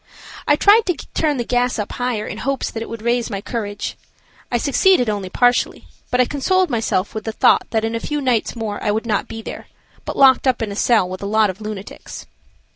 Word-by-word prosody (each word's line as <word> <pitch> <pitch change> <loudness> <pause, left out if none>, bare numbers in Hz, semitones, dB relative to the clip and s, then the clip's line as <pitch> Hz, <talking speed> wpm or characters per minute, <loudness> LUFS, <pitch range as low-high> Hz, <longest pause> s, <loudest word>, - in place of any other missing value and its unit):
I 295 - +5
tried 415 +7 +5
to 360 - +1 0.2
turn 300 -3 +1
the 240 - -1
gas 245 +1 0
up 210 -2 -3
higher 245 -4 -2
in - - -6
hopes 275 -1 -2
that 225 - -5
it - - -6
would 230 -1 -7
raise 235 0 0
my 200 -3 -3
courage. 205 -1 -4 0.6
I 240 - +2
succeeded 275 - +3
only 200 -3 -4
partially, 245 +5 +1 0.2
but 250 - 0
I 250 - +5
consoled 360 +6 +1
myself 220 -4 -1
with 220 - -5
the 220 - -3
thought - - +3
that 220 -1 0
in 225 - -2
a 230 - -1
few 295 +5 -3
nights 250 -5 0
more 220 -3 -4
I - - 0
would 220 +3 -1
not 210 -3 -1
be 225 0 -7
there, - - -8 0.4
but - - -5
locked 270 0 +5
up 255 -2 +2
in 210 - -3
a - - -5
cell 215 -3 +3
with 185 +1 -7
a 200 - -3
lot 215 -1 +3
of 190 +4 -16
lunatics. 210 -2 -8
230 Hz, 230 wpm, -20 LUFS, 210-255 Hz, 0.6 s, I